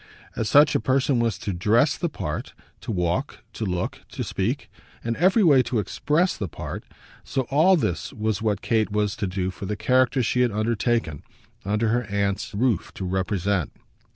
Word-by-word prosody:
As 110 - -1
such 145 +5 +6
a - - +2
person 130 +2 +1
was 115 -4 0
to 100 - -4
dress 110 - +3
the 170 - -2
part, - - -5 0.2
to - - -5
walk, 90 -3 -2
to 110 - -4
look, 90 -1 -2
to - - -3
speak, - - -2 0.4
in 115 0 -1
every 190 +6 +4
way 145 -7 +6
to 125 - -2
express, 150 - +1
the 100 - -4
part, - - -7 0.4
so 135 - -1
all 165 +7 +5
this 110 - -1
was 110 -4 -2
what 105 -3 -1
Kate 110 -2 +1
was 105 -1 0
to 105 - -1
do 95 0 -2
for 95 - -7
the 105 +1 -3
character 130 +2 +2
she 125 +2 +1
had 125 - +4
undertaken, 110 - 0 0.4
under 105 +3 0
her 120 +1 +1
aunt's 100 +1 -2
roof, 110 -4 0
to 95 - -4
represent. 95 -1 -1
110 Hz, 180 wpm, -24 LUFS, 100-130 Hz, 0.4 s, such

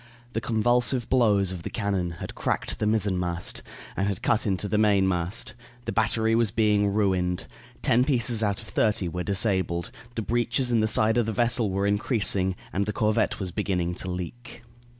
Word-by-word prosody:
The 115 - -1
convulsive 120 +2 +1
blows 105 -7 +3
of 90 -2 -5
the - - -5
cannon 100 -5 -1
had 85 - -7
cracked - - -2
the 105 - 0
mizzenmast, 90 -5 0 0.3
and 95 - 0
had 100 -3 -3
cut 115 -1 +1
into 100 +1 0
the 105 0 +1
mainmast. 95 -2 +1 0.3
The - - -2
battery 110 0 +1
was 115 -1 +3
being 105 -1 +2
ruined. 95 -4 0 0.4
Ten 120 +2 +4
pieces 120 -5 +1
out 100 -2 0
of - - -14
thirty 105 -4 +1
were 90 +1 -4
disabled; 95 -3 0 0.2
the 115 - -2
breaches 120 +3 0
in 115 - +3
the 110 - +2
side 110 +1 +3
of 120 -2 +2
the 110 - -1
vessel 120 -1 +2
were 100 +1 -1
increasing, 100 -3 +1 0.2
and 100 +1 0
the 105 - -1
corvette 105 0 +1
was 95 -3 -4
beginning 90 -3 -1
to 95 +1 -5
leak. 115 +7 -7
105 Hz, 180 wpm, -26 LUFS, 95-115 Hz, 0.4 s, Ten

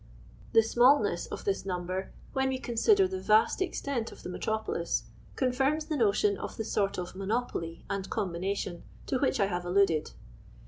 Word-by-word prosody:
The 225 - +7
smallness 245 +5 +4
of - - -7
this 400 -1 0
number, 185 0 -3 0.2
when 265 0 +1
we 260 - -1
consider 370 - +3
the 375 0 -4
vast 215 - +3
extent 280 -10 -2
of - - -13
the - - -5
metropolis, 220 -2 -2 0.3
confirms 270 +4 +1
the 310 -1 -2
notion 205 -5 +2
of - - -6
the 220 - -3
sort 200 -1 0
of 180 0 -5
monopoly 195 -5 -3
and 195 -1 -3
combination 185 -2 -2 0.2
to 260 - 0
which 270 - +1
I 200 - +4
have 180 -2 -2
alluded. 175 -3 +2
220 Hz, 165 wpm, -30 LUFS, 190-265 Hz, 0.3 s, The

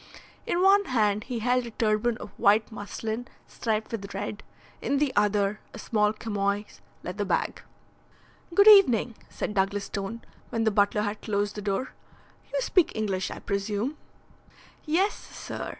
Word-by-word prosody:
In 350 +1 +1
one 400 +1 +6
hand 215 - +1
he 250 -3 -4
held 245 +2 +1
a - - -5
turban 220 +1 0
of - - -9
white 215 0 +4
muslin 220 +3 -5 0.2
striped 220 -2 -2
with 200 -3 -5
red, 205 +1 -4 0.4
in 280 - 0
the 280 -2 +1
other 205 0 +2 0.2
a - - -7
small 210 -2 +1
chamois 205 -2 -1 0.4
leather - - -3
bag. - - -1 0.9
"Good 400 +4 +5
evening," 255 - +7 0.2
said - - -4
Douglas 200 0 0
Stone, 200 +4 -5 0.3
when 225 -1 -1
the 220 - +3
butler 205 +1 +2
had 205 0 -3
closed 205 -1 -1
the 210 - -6
door. 205 +5 -2 0.6
"You - - 0
speak 370 -8 +2
English, 200 -4 -1
I - - -6
presume?" 205 +7 -2 0.9
"Yes, 365 +7 +2
sir. - - -7
215 Hz, 150 wpm, -27 LUFS, 205-245 Hz, 0.9 s, evening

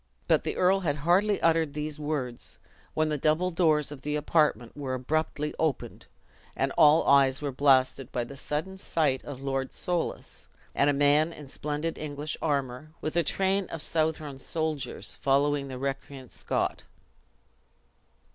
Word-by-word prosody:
But - - +3
the - - -3
earl 185 +2 +4
had 155 -7 0
hardly 180 +7 +2
uttered 160 -3 +2
these 150 0 -3
words, 145 -5 -3 0.4
when 155 0 +2
the 150 -1 -1
double 160 +6 +2
doors 155 -4 +2
of 145 -3 -8
the 150 +1 -2
apartment 150 -6 +1
were 135 -3 -3
abruptly 150 +3 -1
opened, 155 -5 -2 0.5
and - - 0
all 150 +1 +5
eyes 135 -1 +5
were 145 -2 -3
blasted 130 -1 +3
by 120 - -1
the 140 - -9
sudden 155 +7 -4
sight 145 -8 +1
of 140 -2 -8
Lord 135 -1 -2
Soulis, 175 -2 -3 0.3
and 140 - +3
a - - +5
man 145 +3 +3
in 150 -4 -11
splendid 150 +4 -3
English 150 0 -4
armor, 140 -1 -2
with 155 - -4
a 170 - +4
train 190 +4 +1
of 160 -2 -6
Southron 155 -3 -1
soldiers, 155 -1 -3
following 140 +1 +1
the 130 -1 -6
recreant 135 -1 -5
Scot. - - -2
150 Hz, 155 wpm, -28 LUFS, 135-160 Hz, 0.5 s, all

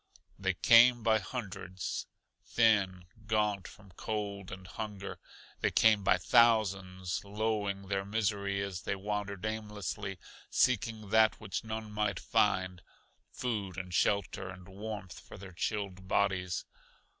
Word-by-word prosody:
They 95 -1 0
came 120 +6 +7
by 110 -1 +4
hundreds 95 -4 -5 0.4
thin, 100 -6 +2 0.2
gaunt 105 -3 +1
from 100 -2 -15
cold 100 0 -4
and 90 0 -8
hunger. 100 0 -6 0.4
They - - +2
came 110 -2 +4
by 95 - +4
thousands, 95 -4 +3
lowing 100 -1 -1
their 95 0 0
misery 100 -1 -1
as 95 -3 -4
they - - -2
wandered 100 0 -3
aimlessly, 105 -2 -4 0.3
seeking 110 -3 +1
that 110 -1 +5
which - - -4
none 110 -1 -5
might 105 -1 0
find: 95 -1 +1 0.5
food 105 -7 -3
and 90 -2 -5
shelter 95 -1 +1
and 90 -2 -10
warmth 100 -1 -7
for - - -12
their 95 -1 -10
chilled 95 0 -3
bodies. 95 -3 0
100 Hz, 125 wpm, -32 LUFS, 95-110 Hz, 0.5 s, came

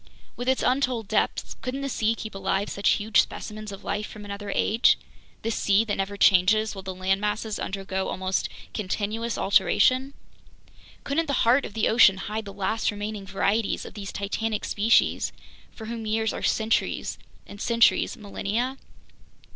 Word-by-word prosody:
With 245 +1 -2
its 260 - +1
untold 250 -4 +1
depths, - - 0
couldn't 265 +2 -4
the 275 - -2
sea 225 -4 0
keep 220 -1 -7
alive 195 +1 -1
such 200 - +1
huge 215 +1 +4
specimens 215 0 -7
of 195 - -9
life 210 +1 -2
from 210 -1 -10
another 200 0 -6
age, 225 +3 +4 0.5
this 225 - -1
sea 205 +2 +2
that 205 - -1
never 195 +1 -2
changes 205 +3 +4
while 195 - -7
the 190 0 -6
land 190 +1 0
masses 210 +1 -2
undergo 190 -1 -3
almost 185 0 -1 0.2
continuous 215 +3 -2
alteration? 255 +7 +3 0.9
Couldn't 320 +4 0
the 280 - +1
heart 250 +4 +4
of 205 - -9
the 220 - +2
ocean 215 -4 +6
hide 215 +3 -4
the 200 - -7
last 200 +3 -1
remaining 205 -1 -5
varieties 200 +2 0
of - - -9
these 200 -2 -6
titanic 210 +2 -2
species, 220 +3 +2 0.4
for 220 - -10
whom 225 -1 -5
years 220 +1 0
are - - -5
centuries 220 0 0 0.3
and 205 - -11
centuries 235 +1 +3
millennia? 225 +4 -3
215 Hz, 165 wpm, -26 LUFS, 200-230 Hz, 0.9 s, ocean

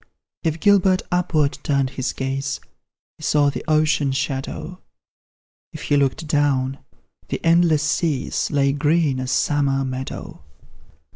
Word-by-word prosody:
If 160 0 -1
Gilbert 195 -2 +4
upward 165 -5 +1
turned 140 -2 0
his 135 0 -2
gaze, 135 +1 -3 0.6
He - - -12
saw 145 -2 +3
the - - -6
ocean 155 -2 +2
shadow; 135 +6 -4 0.9
If - - -8
he 145 - +1
looked 140 +3 +1
down, 140 -3 +1 0.5
the - - -3
endless 165 -3 +4
seas 155 -3 0
Lay 140 -2 +2
green 145 -1 +1
as 130 0 -3
summer 135 -2 +1
meadow. 130 - -6
145 Hz, 125 wpm, -21 LUFS, 135-160 Hz, 0.9 s, Gilbert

